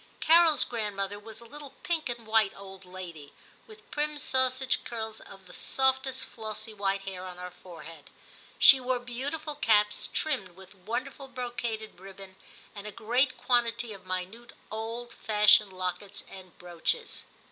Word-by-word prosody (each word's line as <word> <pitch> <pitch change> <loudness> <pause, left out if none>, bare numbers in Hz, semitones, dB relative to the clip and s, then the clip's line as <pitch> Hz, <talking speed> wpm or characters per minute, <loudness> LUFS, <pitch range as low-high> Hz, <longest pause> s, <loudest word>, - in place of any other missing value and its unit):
Carol's 330 -1 +6
grand 215 -4 -2
mother 200 +1 -2
was 220 +1 -10
a - - -12
little 285 +2 -11
pink 325 -5 0
and 235 -1 -4
white 220 -2 +4
old 195 -1 -10
lady, 175 -5 -9 0.3
with 435 -1 -16
prim 300 0 -1
sausage 260 -1 +1
curls 220 -2 -4
of 195 -1 -13
the 180 - -14
softest 265 0 +1
flossy 220 0 -7
white 195 -1 0
hair 190 -2 -6
on 180 -1 -7
her 180 0 -6
forehead. 165 -4 -12 0.5
She 270 - +9
wore 255 0 0
beau 245 +2 -4
tiful 310 0 -4
caps, 210 -7 +3
trimmed 195 - -1
with 190 +1 -14
wonderful 235 +8 -4
brocaded 240 -5 -4
ribbon, 195 0 -11 0.4
and 205 0 -7
a - - -5
great 245 +5 +1
quantity 235 -2 +1
of 190 -2 -13
minute 185 +6 -4 0.2
old 230 +2 -4
fashioned 210 -1 +5
lockets 185 +2 -4
and 185 -2 -12
brooches. 175 -2 -2
220 Hz, 155 wpm, -29 LUFS, 190-255 Hz, 0.5 s, She